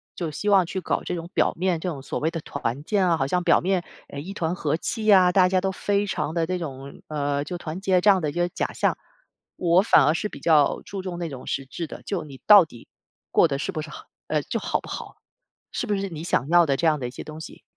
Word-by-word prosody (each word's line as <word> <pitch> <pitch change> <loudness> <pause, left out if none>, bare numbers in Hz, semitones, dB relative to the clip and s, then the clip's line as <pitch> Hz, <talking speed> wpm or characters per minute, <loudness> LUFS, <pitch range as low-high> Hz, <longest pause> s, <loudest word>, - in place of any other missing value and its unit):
就 170 -3 -3
希 205 +8 -3
望 195 -3 +5
去 190 0 -4
搞 - - -1
这 180 - -3
种 170 +1 -6
表 - - +2
面 180 -1 0
这 180 - -3
种 140 -5 -6
所 - - -4
谓 160 - +1
的 165 - -4
团 140 -2 -4
建 195 +2 +1
啊， 165 - +3
好 135 - 0
像 180 +5 0
表 170 - +5
面， 185 0 0 0.3
呃， 140 - -7
一 180 +7 -7
团 165 -3 -1
和 155 -3 -1
气 215 +4 0
啊， 185 -2 +6
大 180 -1 +4
家 185 0 +2
都 190 0 0
非 200 +2 0
常 155 -5 -2
地 165 -1 +1
这 180 +1 -2
种 140 -3 -8
呃， 145 -1 -1
就 175 +3 -5
团 170 +2 -6
结 185 -2 +2
这 210 - +5
样 190 -2 +2
的 150 - -1
一 - - -6
个 175 0 0
假 - - -3
象。 - - 0 0.6
我 175 +1 +3
反 160 -8 +5
而 150 - +4
是 175 - -2
比 - - -10
较 155 -4 +3
注 195 -1 -6
重 180 -2 -5
那 170 - -2
种 130 -2 -9
实 135 - -2
质 160 +5 -6
的， - - -10
就 185 -6 -3
你 140 -3 -11
到 205 -5 +9
底 120 -6 -15 0.4
过 - - +5
得 140 -3 -2
是 150 - -3
不 155 -4 -4
是 155 - -8
好 - - -10 0.2
呃， - - 0
就 - - -3
好 - - -1
不 - - -12
好？ - - -7 0.6
是 245 - -2
不 205 - +1
是 195 0 -3
你 155 -2 -7
想 145 -5 0
要 175 0 +6
的 140 - +1
这 170 - -1
样 155 -1 +2
的 125 - -3
一 - - -7
些 125 - -8
东 155 0 -9
西 160 - -11
170 Hz, 295 characters per minute, -24 LUFS, 150-185 Hz, 0.6 s, 到